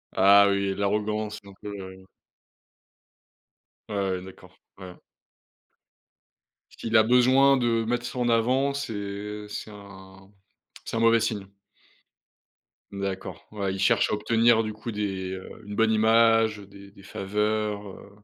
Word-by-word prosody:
Ah 100 +1 +6
oui, 100 0 0
l'arrogance, 105 +1 -2
donc 100 -1 -15
heu 95 -2 -8 1.8
Ouais, 105 - -4
ouais 95 -2 -1
d'accord, 90 -1 -14 0.2
ouais. 90 -1 -9 1.8
Ce - - -19
qu'il 115 0 -3
a 110 - +6
besoin 130 +3 +4
de 115 -2 +1
mettre 120 +1 -2
ça - - -6
en 120 -1 0
avant 130 +5 +2
c'est, 140 -5 -4
heu, 105 +1 -6
c'est 105 - -6
un 95 -1 -14 0.5
c'est - - -5
un - - 0
mauvais 115 0 +4
signe. 105 -4 -2 1.5
D'accord, 95 -3 -6
ouais, 100 -2 -2
il 95 - -6
cherche 95 - +2
à - - 0
obtenir 115 +1 +3
du 110 -1 -4
coup 110 +2 -7
des, 95 -3 -3
heu, 95 0 -7 0.2
une 105 - -7
bonne 110 0 +3
image, 115 0 +3
heu 100 - -11
des 100 0 -14
des 100 - -17
faveurs, 105 +1 -2
heu, 95 +1 -12
105 Hz, 145 wpm, -26 LUFS, 100-115 Hz, 1.8 s, Ah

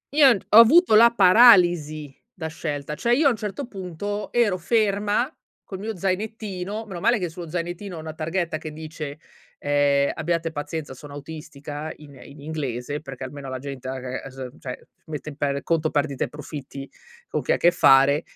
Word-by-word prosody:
Io 290 -3 +8
n 220 - +2
ho 210 - +6
avuto 280 +5 +7
la 230 +2 +8
paralisi 175 - +5 0.2
da 175 -8 -8
scelta. 150 -2 -5
Cioè, 235 +10 +1
io, 300 +4 +2
a - - +5
un - - -1
certo 215 +6 -5
punto, 205 0 -5
ero 225 -6 +2
ferma, 210 +3 +1 0.4
col 190 - -8
mio 215 0 -5
zainettino, 205 +1 -3
meno 190 -5 -7
male 235 +6 +3
che 180 -4 -3
sullo 170 0 -9
zainettino 175 +2 -5
ho - - -6
una 155 0 -7
targhetta 165 +1 -2
che 155 0 -7
dice, 155 -1 -7 0.4
ehm: 145 -1 +2
"Abbiate 165 0 -2
pazienza, 145 -1 -5
sono 140 +2 -12
autistica" 150 0 -7
in 150 -2 -15
in 140 +1 -13
inglese, 145 -2 -4
perché, 135 -3 -8
almeno, 135 +1 -7
la 130 - -4
gente, 135 -1 -7
aga 130 0 -5
ese 135 0 -8
ehm, 125 +2 -10
cioè, 125 -2 -8 0.2
mette 155 -1 -6
in 145 - -10
per 140 -1 -2
conto 160 -1 +1
perdite 145 -2 -1
e - - -10
profitti, 140 -2 -8 0.4
con - - -2
chi - - -1
ha - - +4
a - - -2
che 175 - +4
fare. 140 -3 +5
160 Hz, 190 wpm, -24 LUFS, 145-200 Hz, 0.4 s, Io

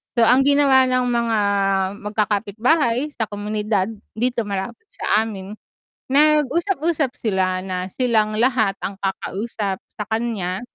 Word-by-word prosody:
so 235 - +3
ang 250 +3 +5
ginawa 280 -2 +5
ng 255 0 +1
mga 235 -2 +1 0.6
magkakapitbahay 220 - 0
sa 230 -6 -2
komunidad 210 -1 -1 0.3
dito 240 0 -1
malapit 200 - -5
sa 220 - +1
amin, 200 -3 -7 0.6
nag-usap-usap 305 +1 +2
sila 185 -3 0
na 185 -1 -3
silang 220 -4 +1
lahat 225 -4 +2
ang 195 -1 -4
kakausap 195 +1 -3
sa 210 - -8
kanya 215 -5 -2
225 Hz, 115 wpm, -21 LUFS, 200-255 Hz, 0.6 s, ang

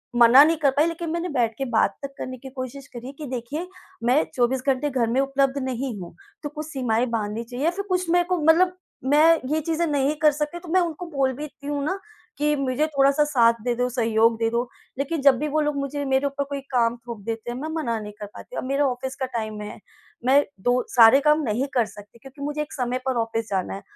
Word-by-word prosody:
मना 240 +4 +8
नहीं 325 +1 +2
कर 285 -3 +3
पाई, 290 +4 +3
लेकिन 335 0 -4
मैंने 340 +2 -2
बैठ 240 -5 0
के 270 - -2
बात 220 -3 +2
तक 275 0 -6
करने 255 0 -6
की 265 +2 -10
कोशिश 260 +1 -7
करी 240 +1 -8
है - - -6
कि, 305 - -6
"देखिए, 280 +8 -4 0.4
मैं 255 +6 +4
24 250 +1 +1
घंटे 270 +2 +1
घर 250 -4 0
में 250 - +1
उपलब्ध 275 0 +1
नहीं 255 -2 -3
हूँ।" 175 - -9 0.3
तो 295 - -3
कुछ 300 +1 -6
सीमाएँ 250 -5 0
बाँधनी 215 +1 -2
चाहिए 245 +5 -4
या 335 - +3
फिर 400 +2 -5
कुछ 365 -2 0
मेरे 350 +1 +4
को 360 - +3
मतलब 360 +3 +5 0.4
मैं 295 - +5 0.3
ये 310 +1 +1
चीज़ें 330 +2 0
नहीं 290 0 +1
कर 305 -1 +6
सकती, 300 +4 -3
तो 345 - -12
मैं 370 +3 +4
उनको 340 +1 -3
बोल 270 -3 0
भी 290 +4 -7
देती 285 -1 -10
हूँ 290 -1 -2
ना 375 +6 -2 0.4
कि, 295 0 +2
"मुझे 275 +2 0
थोड़ा-सा 280 0 +3
साथ 235 -6 +3
दे 245 0 0
दो, 245 +1 0
सहयोग 230 -2 +2
दे 225 0 +1
दो।" 240 +1 -1 0.3
लेकिन 285 +2 -1
जब 270 -3 +6
भी 300 - -1
वो 310 +1 +1
लोग 295 -1 0
मुझे 280 +1 -3
मेरे 265 +1 +1
ऊपर 280 0 -2
कोई 280 -1 -4
काम 235 -1 +2
थोप 235 -3 -6
देते 225 +1 -4
हैं, 240 - -5
मैं 310 - -4
मना 235 -8 -1
नहीं 210 0 -8
कर 210 - -5
पाती। - - -11
अब - - -2
मेरा 275 +2 +1
ऑफ़िस 260 +1 -4
का 265 - -2
टाइम 215 -1 -4
है, 210 - -8 0.5
मैं 275 +3 +5 0.2
दो 245 +2 +2
सारे 235 +3 +8
काम 300 +1 +4
नहीं 245 +4 -1
कर 245 -3 +3
सकती 205 +2 -14
क्योंकि 270 +3 -13
मुझे 295 +1 -2
एक 300 - -6
समय 250 -1 -1
पर 260 -2 0
ऑफ़िस 225 -1 -2
जाना 190 -2 -2
है। 195 - -8
270 Hz, 245 wpm, -24 LUFS, 235-300 Hz, 0.5 s, मना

